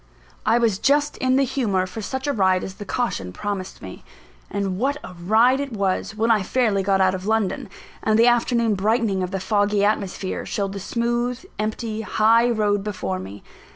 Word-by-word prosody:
I 225 +2 +5
was 225 -5 +1
just 290 +1 +2
in 255 0 +1
the 275 - +4
humour 215 -8 0
for 185 +4 -7
such 265 +6 -4
a 285 - 0
ride 190 -4 +2
as 190 - -6
the 205 - -9
caution 185 - -2
promised 195 - -5
me. - - -9 0.5
And 195 -2 -2
what 280 +4 0
a 180 - -9
ride 220 +9 +3
it 280 -3 -4
was, 200 +1 -1
when 225 +2 +2
I 215 -2 +3
fairly 215 -1 +1
got 195 0 +1
out 185 -1 +3
of 190 +1 -5
London; 220 +2 0 0.3
and 215 0 +2
the 230 - +6
afternoon 235 -2 +3
brightening 205 0 +1
of 180 - -2
the 195 +1 -3
foggy 205 +1 +1
atmosphere, 200 -2 -2
showed 195 -1 -3
the 200 - -5
smooth, 240 - -2
empty 220 +1 -3
high 225 +2 +3
road 205 -3 +1
before 100 - -3
me! 95 +2 -9
215 Hz, 190 wpm, -22 LUFS, 190-235 Hz, 0.5 s, the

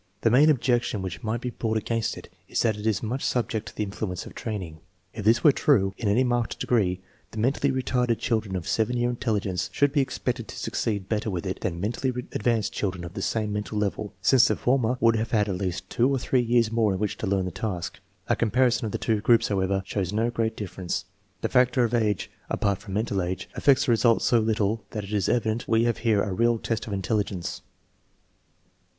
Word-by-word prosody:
The 115 - +3
main 145 +6 +6
objection 120 -6 +1
which 95 +1 -5
might 110 +1 -2
be 125 - -3
brought 110 -2 -1
against 115 +1 -1
it - - -10 0.2
is - - 0
that 110 -3 +2
it 105 +1 -4
is 110 -1 0
much 125 +5 -2
subject 115 -3 -1
to - - -10
the 105 - -1
influence 100 -3 -4
of - - -10
training. 95 -8 -5 0.3
If 105 - -6
this 115 +2 +4
were 150 - +8
true 100 -9 +2
in 115 - -3
any 110 +6 +3
marked 120 -2 -1
degree, 95 -6 +1 0.3
the - - -11
mentally 135 +5 +1
retarded 125 -2 0
children 110 -5 -1
of 90 -3 -4
7 115 +2 +1
year 120 0 +1
intelligence 105 -7 -1
should 145 -1 +2
be 145 - +4
expected 125 -3 -3
to - - -9
succeed 100 -4 -2
better 110 0 -1
with 90 -4 -3
it - - -4
than 85 - -2
mentally 120 +7 -1 0.2
advanced 115 -1 0
children 95 -4 -2
of 85 0 -7
the 100 - -5
same 105 0 -1
mental 105 +1 -3
level, 105 0 -2
since 130 +4 +6
the - - +1
former 125 -1 +1
would 115 -1 +4
have 115 +1 -2
had 105 -3 +2
at 95 -3 -2
least 95 -1 -3
two 120 +6 +2
or 135 - +1
three 130 0 +1
years 120 -1 +2
more 110 -3 +2
in 95 - -3
which 105 -1 -2
to 110 - -3
learn 95 -1 +1
the 90 - -3
task. 95 -1 -4 0.3
A - - +2
com 115 - 0
parison 125 +2 +3
of 110 - -3
the - - 0
two 110 -3 0
groups, 115 +1 +4
however, 95 -1 0
shows 95 -3 -2
no 115 +3 0
great 115 -1 -1
dif 105 -3 -6
ference. 90 -2 -2 0.4
The - - 0
factor 125 -1 +3
of 115 0 0
age, 105 -5 0 0.2
apart 100 -2 0
from 100 -1 -7
mental 105 -2 0
age, 90 +2 -4
affects 140 0 +3
the 125 - +2
results 115 0 +3
so 120 - +4
little 110 0 0
that 105 -2 -4
it 100 +2 -7
is 100 -3 +1
evident 115 -1 0
we 115 0 +3
have 120 -1 0
here 110 -3 +2
a 100 - -2
real 115 +4 +2
test 115 0 -3
of 105 - -4
intelligence. 100 -2 -2
110 Hz, 230 wpm, -26 LUFS, 100-120 Hz, 0.4 s, were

